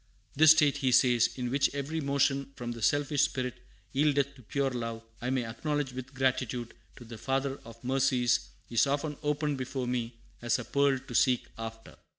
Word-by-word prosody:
"This 155 +2 +7
state," 145 -2 +3
he 135 -2 +1
says, 120 -2 +5
"in 125 -2 -3
which 140 +1 +3
every 145 +3 -2
motion 140 -1 +1
from 120 -1 -5
the 115 -1 -7
selfish 145 +2 +2
spirit 125 -2 -1 0.3
yieldeth 140 -1 +2
to 135 - -16
pure 135 +4 -1
love, 115 -2 -4 0.2
I 125 - -2
may 130 -2 0
acknowledge 140 +4 -2
with 130 +1 -8
gratitude 125 -3 -1 0.2
to 120 - -12
the 115 -1 -10
Father 135 +1 -1
of 115 +1 -13
Mercies, 130 -2 +2 0.2
is 120 +3 +2
often 145 +2 -1
opened 150 -1 -1
before 130 0 -3
me 120 -1 -3 0.2
as 120 -1 +1
a - - -6
pearl 140 -1 +2
to 130 -1 -10
seek 125 +1 +3
after." 115 0 -8
130 Hz, 180 wpm, -30 LUFS, 120-140 Hz, 0.3 s, This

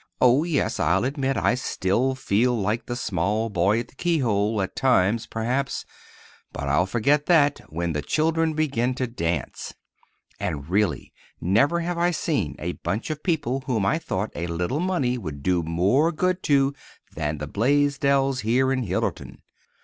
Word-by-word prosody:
Oh, 130 +4 +5
yes, 165 -5 -1
I'll - - +2
admit 135 -1 -1
I - - +2
still 125 +1 0
feel 120 0 +1
like 105 +4 -1
the 120 - -3
small 105 +1 -1
boy 100 +5 +2
at 120 - -11
the - - -21
keyhole, 115 - 0
at 95 - -2
times, 115 -4 +2
perhaps; 125 +4 -2 0.7
but 70 - -5
I'll 75 +7 +2
forget 140 +8 +1
that—when 140 - +1
the 75 - -1
children 160 - +1
begin 130 -5 0
to 130 - -1
dance. 85 - -3 0.6
And, 70 -1 -3
really, 95 - 0 0.3
never 140 - +2
have 170 0 -2
I 175 +1 +3
seen 160 -3 -1
a 85 - -3
bunch 110 - -3
of 150 -1 -5
people 145 -7 -1
whom 110 -7 0
I 155 +11 +2
thought 100 - -3
a 85 - -3
little 90 - -2
money 160 -9 0
would 75 -8 -7
do 90 -2 +2
more 95 - +2
good 185 +3 0
to 140 -1 +4 0.4
than 75 0 -2
the 75 +1 -5
Blaisdells 135 - +2
here 125 +5 +2
in 130 - -1
Hillerton. 95 -5 -3
120 Hz, 160 wpm, -24 LUFS, 95-145 Hz, 0.7 s, Oh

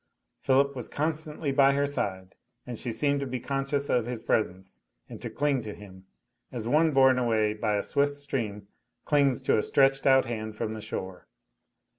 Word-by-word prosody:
Philip 140 +1 +2
was 125 -3 -5
constantly 155 -1 -2
by 135 0 +5
her 140 +1 +1
side, 95 -9 -3 0.3
and 125 - -6
she 120 - -4
seemed 140 +5 +1
to 140 - -3
be 125 0 -3
conscious 140 +2 -2
of 120 -2 +1
his 120 -2 -5
presence, 95 -5 -2 0.3
and - - -10
to - - -5
cling 145 -3 0
to 105 -2 -7
him, 95 -2 -14 0.4
as 115 -3 -5
one 155 +6 +4
borne 130 -3 +4
away 110 -3 +1
by 105 0 -1
a 100 - -1
swift 145 0 +1
stream 115 -8 -4 0.4
clings 140 -4 +2
to - - +3
a - - +2
stretched 135 +2 +2
out 130 -1 +5
hand 110 -3 -5
from 110 0 -3
the 110 - -7
shore. 95 -4 -6
130 Hz, 185 wpm, -27 LUFS, 110-140 Hz, 0.4 s, by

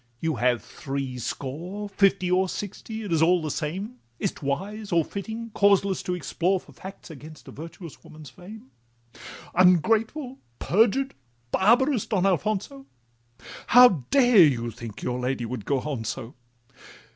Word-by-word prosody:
—you 160 -1 -1
have 120 -3 +1
threescore— 140 - -5
Fifty, 195 -2 +2
or 185 +1 +2
sixty, 220 +3 -6
it 195 -5 -3
is 160 - +2
all 175 +2 +4
the 155 -2 -4
same— 190 - -4 0.2
Is - - -1
't - - -15
wise 200 +9 -3
or 165 -2 +3
fitting, 220 +3 -6
causeless 200 -2 +2
to 180 - -3
explore 180 +1 -1
For - - -18
facts 190 -2 -11
against 155 0 -12
a - - -9
virtuous 165 +1 -10
woman's 155 -4 -13
fame? 180 - -13 0.8
Ungrateful, 225 - +2 0.2
perjured, 230 +8 +2 0.4
barbarous 240 +4 +3
Don 195 -3 0
Alfonso, 215 - -1 0.8
How 245 - +7
dare 245 -6 +5
you 120 -7 +3
think 115 -2 -9
your 125 0 -2
lady 125 -1 -2
would 115 -3 -6
go 140 -2 0
on 140 -6 -4
so? 120 +2 -5
180 Hz, 145 wpm, -25 LUFS, 140-210 Hz, 0.8 s, How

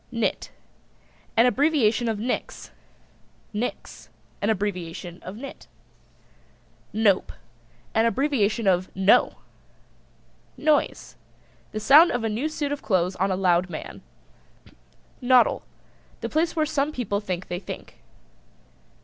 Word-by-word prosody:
NIT. 230 -2 -2 0.9
An 230 - +6
abbreviation 250 -3 +2
of 220 - -1
Nix. 235 +4 -4 0.8
NIX. 220 +4 -5 0.3
An 205 - +1
abbreviation 180 -4 -3
of 185 - -8
Nit. 275 +3 -9 1.2
NOPE. 210 -3 +2 0.6
An 225 +1 +3
abbreviation 235 -4 +1
of 185 -1 +2
No! 190 +2 +4 1.2
NOISE. 305 -1 0 0.5
The 215 - -4
sound 295 +10 +7
of 245 -2 -2
a 225 - 0
new 240 +9 -1
suit 295 -2 -3
of 290 - -3
clothes 185 -2 0
on 195 +2 +1
a 190 - +1
loud 180 -1 +2
man. 155 - -7 1.2
NODDLE. 250 0 +4 0.6
The - - -3
place 330 +2 0
where 310 -2 +2
some 290 -1 0
people 220 -8 -2
think 185 -3 -4
they 175 - -4
think. 190 - -9
220 Hz, 115 wpm, -25 LUFS, 190-270 Hz, 1.2 s, sound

